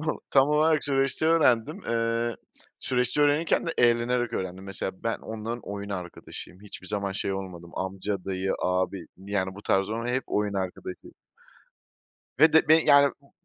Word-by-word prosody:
tam 155 - -6
o - - -2
tam 135 +1 +5
olarak 155 0 +3
süreçte 135 +2 +1
öğrendim. 145 -9 +3
Eee, 115 0 0 0.4
süreçte 125 +2 +1
öğrenirken 145 +4 +2
de - - 0
eğlenerek 120 0 +2
öğrendim. 95 +1 -4
Mesela 95 -1 -4
ben 115 - 0
onların 110 +2 -5
oyun 100 0 -6
arkadaşıyım. 90 0 -8
Hiçbir 100 -2 -10
zaman 100 0 -2
şey 100 0 -2
olmadım. 90 -3 -7
Amca, 95 0 -3
dayı, 95 0 -1
abi, 90 -1 -1
yani, 95 0 -3
bu 100 - -11
tarz 95 -1 +1
on 115 +2 -3
hep 125 +2 -1
oyun 105 -1 -1
arkadaşıyım. 95 -1 -5 1.2
Ve 160 0 +6
de 160 - +5
be 155 - +8
yani, 140 -1 +6
bu 140 - -25
110 Hz, 160 wpm, -27 LUFS, 95-135 Hz, 1.2 s, be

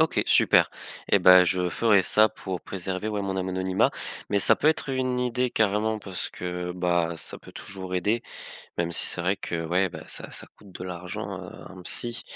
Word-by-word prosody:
OK 160 - +3
super - - +4 0.4
et 100 - +4
bah, 90 0 +8
je 90 0 +1
ferai 105 -5 +4
ça 110 +3 +4
pour 95 -4 -6
préserver, 95 +2 -4
ouais, 105 -2 -2
mon 95 -1 -2
anonymat 95 0 +1 0.4
mais 100 -1 +1
ça - - +5
peut 150 - -1
être 155 -2 +2
une 130 -1 0
idée 125 0 0
carrément, 110 0 +1
parce 95 -2 -5
que 90 0 -4
bah, 85 -2 +1
ça - - -4
peut - - -15
toujours 95 -1 -7
aider. 105 +6 +1 0.6
Même 85 0 0
si - - +2
c'est 90 - -2
vrai 95 +3 +1
que 85 -3 -4
ouais 90 +3 +2
bah, - - -9
ça - - -4
ça - - -6
coûte 100 - -17
de 90 - -8
l'argent, 90 0 -6
heu, - - -9 0.2
un 95 -1 -11
psy, 120 +6 -1
95 Hz, 200 wpm, -26 LUFS, 90-110 Hz, 0.6 s, bah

